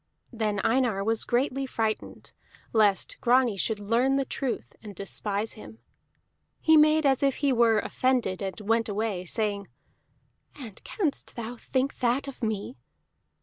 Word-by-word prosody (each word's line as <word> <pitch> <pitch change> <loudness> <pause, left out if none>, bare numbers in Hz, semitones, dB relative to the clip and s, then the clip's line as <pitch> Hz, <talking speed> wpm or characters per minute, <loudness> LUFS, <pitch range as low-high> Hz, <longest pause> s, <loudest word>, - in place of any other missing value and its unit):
Then 215 -3 -1
Einar 230 -5 +1
was 225 +1 +1
greatly 265 +2 0
frightened 220 -3 -3 0.4
lest 210 -3 +2
Grani 245 -2 +3
should 210 +2 -1
learn 235 +6 +2
the 275 0 +1
truth 260 -1 -4
and 210 -3 -10
despise 205 +2 -2
him; 220 0 -12 0.8
he 320 - +5
made 305 0 +5
as 270 -2 +3
if 275 -2 +2
he 280 -2 +1
were 230 -2 +4
offended, 240 -5 0
and 195 +2 -4
went 225 +2 +1
away, 205 -3 -2
saying: 200 +1 -2 0.9
"And 235 -9 -10
canst 335 -10 -3
thou 235 0 -5
think 260 +3 -2
that 255 +3 +1
of 275 - -9
me?" 220 +2 -3
230 Hz, 145 wpm, -27 LUFS, 210-265 Hz, 0.9 s, he